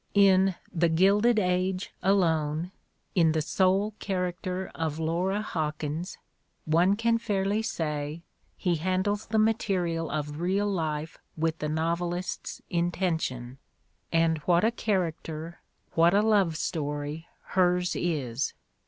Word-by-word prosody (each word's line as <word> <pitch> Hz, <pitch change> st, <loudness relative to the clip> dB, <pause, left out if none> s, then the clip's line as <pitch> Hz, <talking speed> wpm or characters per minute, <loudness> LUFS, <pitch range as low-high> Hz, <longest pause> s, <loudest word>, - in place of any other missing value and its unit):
In 195 Hz, -2 st, +5 dB, 0.2 s
"The 170 Hz, -1 st, +2 dB
Gilded 200 Hz, +8 st, +4 dB
Age" 185 Hz, -1 st, 0 dB
alone, 165 Hz, -3 st, +1 dB, 0.4 s
in 165 Hz, -4 st, +4 dB
the 160 Hz, -, +1 dB
sole 195 Hz, +5 st, +2 dB
"character 185 Hz, 0 st, -3 dB
of 160 Hz, -2 st, -2 dB
Laura 180 Hz, +6 st, 0 dB
Hawkins, 155 Hz, -1 st, -3 dB, 0.5 s
one 170 Hz, +5 st, +3 dB
can 230 Hz, +1 st, +2 dB
fairly 205 Hz, -1 st, 0 dB
say, 150 Hz, -4 st, -3 dB, 0.3 s
he 175 Hz, -3 st, 0 dB
handles 185 Hz, +5 st, -1 dB
the 220 Hz, -, 0 dB
material 185 Hz, -7 st, +1 dB
of 150 Hz, 0 st, -3 dB
real 190 Hz, +4 st, +1 dB
life 160 Hz, -5 st, -2 dB, 0.2 s
with 160 Hz, 0 st, 0 dB
the 150 Hz, -, -2 dB
novelist's 170 Hz, +3 st, -2 dB
intention, 165 Hz, -8 st, -1 dB, 0.5 s
and 165 Hz, -1 st, +2 dB
what 170 Hz, +4 st, +2 dB
a 225 Hz, -, +4 dB
character, 170 Hz, -6 st, -2 dB, 0.3 s
what 170 Hz, +3 st, +4 dB
a 205 Hz, -, +4 dB
love 200 Hz, -7 st, +3 dB
story, 145 Hz, 0 st, -3 dB, 0.2 s
hers 180 Hz, -1 st, +2 dB
is! 140 Hz, -7 st, -1 dB
175 Hz, 120 wpm, -28 LUFS, 160-190 Hz, 0.5 s, In